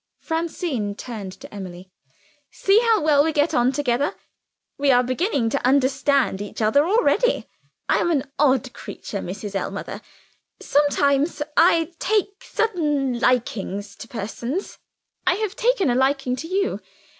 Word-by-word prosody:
Francine 320 - -3
turned 210 -5 -7
to - - -13
Emily. 185 -2 -9 0.6
"See 395 +2 +3
how 455 -3 +3
well 290 -2 +5
we 320 - +1
get 300 +1 +1
on 245 -1 +3
together. 270 0 0 0.6
We 285 0 +2
are 250 -1 +5
beginning 255 - 0
to - - -1
understand 265 -4 +2
each 205 - -7
other 260 +8 +3
already. 485 +4 +2 0.4
I - - +3
am - - +1
an 295 -6 +1 0.2
odd 265 -3 +2
creature, 200 - -7
Mrs. 195 +3 -6
Ellmother. 195 - -4 0.6
Sometimes, 290 +1 +2
I 335 0 +4
take 405 -1 0
sudden 295 - 0
likings 205 -5 -1
to - - -9
persons 240 - -5 0.5
I 365 - +4
have 420 -1 -3
taken 445 - +2
a - - +2
liking 265 0 +1
to 325 - -6
you. 390 +3 -1
280 Hz, 140 wpm, -23 LUFS, 240-335 Hz, 0.6 s, well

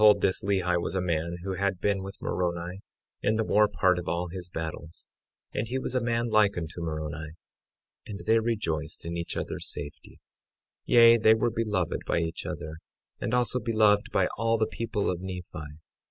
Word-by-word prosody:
Now - - +7
behold, 100 - -9
this 95 - +2
Lehi 90 -3 +1
was 95 - -3
a - - +2
man 85 -1 -1
who 95 0 -2
had 100 0 -1
been 100 0 +1
with 95 +1 -8
Moroni 90 +1 -2 0.4
in 110 - +2
the 110 - +1
more 105 0 +4
part 90 -3 +2
of 90 - -7
all 85 +1 -1
his 90 0 -7
battles; 80 0 -6 0.5
and 110 - -1
he 130 - -2
was 130 - -3
a 125 - +1
man 120 0 0
like 105 -3 +4
unto 85 0 -5
Moroni, 80 -1 -4 0.7
and 100 -2 -6
they 115 +1 +5
rejoiced 95 -11 -2
in 85 0 -3
each 85 0 -3
other's - - -4
safety; 70 -2 -9 0.7
yea, 115 -1 +7
they 110 0 +6
were 115 +1 +1
beloved 105 -7 -1
by - - +1
each 80 0 -2
other, 80 +1 -5 0.4
and 120 - -1
also 125 0 +1
beloved 110 -3 +3
by - - +3
all 115 0 +2
the 110 - +2
people 115 -3 -2
of 90 -1 -1
Nephi. 90 -5 -7
95 Hz, 190 wpm, -28 LUFS, 85-110 Hz, 0.7 s, Now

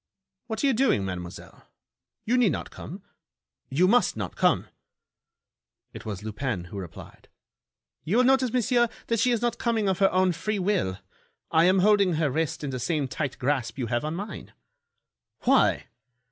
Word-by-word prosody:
"What 220 +1 -3
are - - +4
you 270 - +4
doing, 225 - +2
Mademoiselle? 90 -2 -8 0.6
You 240 - +2
need 245 -7 +4
not - - -5
come. 185 +6 -9 0.7
You 165 +8 +3
must 240 - +3
not 100 -5 -4
come!" - - +2 1.3
It - - -9
was 105 -2 -5
Lupin 110 -2 -3
who 100 +3 -8
replied: 85 -4 -11 0.8
"You 195 +9 0
will 250 - +5
notice, 260 -1 +3
monsieur, 240 -1 +2 0.2
that 230 -1 +1
she 250 - +3
is 240 -1 0
not 235 -1 0
coming 225 -3 0
of 190 -2 0
her 195 -1 +5
own 185 0 +3
free 215 +5 -2
will. 185 - 0 0.5
I 160 +1 +5
am 185 +1 +4
holding 200 -4 +4
her 155 -3 +1
wrist 160 +1 -2
in 140 - -3
the 130 - -4
same 140 +2 -1
tight 140 +2 -4
grasp 130 -3 -1
that - - -11
you - - -1
have 120 - 0
on 155 +2 -3
mine." 205 +4 -7 0.9
"Why?" - - +3
180 Hz, 175 wpm, -26 LUFS, -, 1.3 s, will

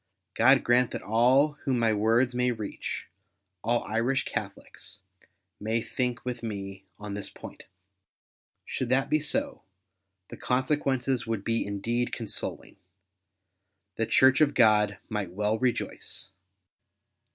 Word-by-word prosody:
God 130 +4 +5
grant 120 +1 +3
that - - -6
all 130 +8 +3
whom 130 -2 +1
my 115 -2 +2
words 115 +4 +2
may 125 0 +1
reach 110 -4 -4 0.3
— 95 -2 -54
all 120 +2 +1
Irish 120 +5 0
Catholics - - -7 0.3
— - - -51
may 110 +2 0
think 125 +1 -3
with 125 -1 -4
me 100 -3 -6
on 105 -1 -7
this 100 0 -5
point. - - -11 1.0
Should 130 - -3
that 135 +2 +1
be 155 - +4
so 275 - -1 0.7
the - - -9
consequences 130 -1 0
would 110 -3 -2
be 115 +1 0
indeed 115 +5 -2
consoling. 110 -3 -5 1.2
The - - 0
Church 130 +2 +5
of 145 -2 +3
God 105 -4 +4
might 105 -5 -4
well 105 +3 0
rejoice. 125 -2 -2
120 Hz, 130 wpm, -28 LUFS, 105-130 Hz, 1.2 s, God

